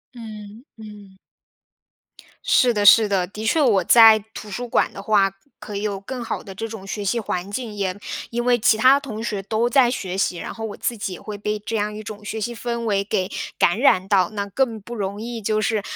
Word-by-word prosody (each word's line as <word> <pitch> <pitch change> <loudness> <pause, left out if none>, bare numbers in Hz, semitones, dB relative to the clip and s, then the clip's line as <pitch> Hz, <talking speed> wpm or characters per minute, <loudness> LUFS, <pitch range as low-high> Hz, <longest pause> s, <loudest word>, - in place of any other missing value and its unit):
嗯 215 -1 -10
嗯。 210 -3 -13 1.3
是 245 -2 +4
的 205 -1 0
是 220 +1 +8
的， 195 -3 +1
的 210 +4 -8
确 305 +8 +2
我 210 -9 +3
在 225 -2 +8
图 210 - -9
书 245 +5 -4
馆 - - +1
的 195 - -9
话， 200 -1 +3 0.3
可 205 - -7
以 - - -4
有 205 -2 -2
更 250 +5 -6
好 230 - -4
的 195 - -9
这 225 +4 -5
种 220 -3 -9
学 205 +1 -5
习 220 +5 0
环 185 -1 -4
境， 225 0 -5
也， 195 -3 -2 0.4
因 240 +1 -2
为 245 -1 +3
其 220 - +4
他 260 +5 +5
同 225 -6 -7
学 210 -4 -3
都 220 +4 0
在 245 0 +4
学 190 -6 -4
习， 190 -2 0
然 - - -6
后 225 - -6
我 210 - -6
自 235 - -3
己 195 -2 -4
也 - - -10
会 210 -1 -7
被 210 +1 -2
这 215 +2 -4
样 210 0 -2
一 215 - -7
种 210 0 -9
学 220 +1 -4
习 240 +3 -3
氛 235 0 -4
围 205 -4 0
给 195 -2 -2 0.3
感 175 +6 +2
染 195 -8 +3
到。 185 -3 +3
那 200 -1 -2
更 230 0 -1
不 235 +4 -9
容 205 -1 -4
易， 235 0 -5
就 215 +1 0
是， 215 0 0
215 Hz, 245 characters per minute, -22 LUFS, 200-230 Hz, 1.3 s, 是